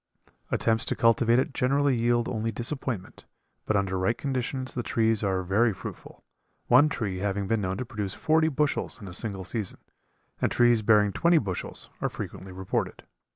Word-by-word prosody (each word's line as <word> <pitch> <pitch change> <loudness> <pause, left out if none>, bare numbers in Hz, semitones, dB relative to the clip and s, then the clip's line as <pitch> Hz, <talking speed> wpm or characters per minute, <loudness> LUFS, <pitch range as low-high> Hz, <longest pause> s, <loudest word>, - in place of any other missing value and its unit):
Attempts 115 0 +1
to - - -1
cultivate 115 +1 +4
it 130 - 0
generally 140 +1 +2
yield 120 0 +1
only 115 0 -2
disappointment, 120 -3 -4 0.4
but 110 - +1
under 95 -1 -1
right 95 +6 +1
conditions 130 -1 -3
the 125 - -2
trees 115 -2 +1
are 95 -2 0
very 105 +6 +2
fruitful, - - -10 0.4
one 130 +5 +6
tree 100 -9 -3
having 100 0 -1
been 110 +2 0
known 95 0 -2
to 130 - -3
produce 105 -4 -4
forty 160 0 +2
bushels 150 -4 -1
in 100 - -9
a 90 - -8
single 100 -1 -2
season, 105 0 -3 0.6
and - - +1
trees 120 -2 +4
bearing 105 -2 +4
twenty 170 0 +4
bushels 95 - -2
are - - 0
frequently 95 0 -7
reported. 95 0 -3
115 Hz, 170 wpm, -27 LUFS, 100-125 Hz, 0.6 s, one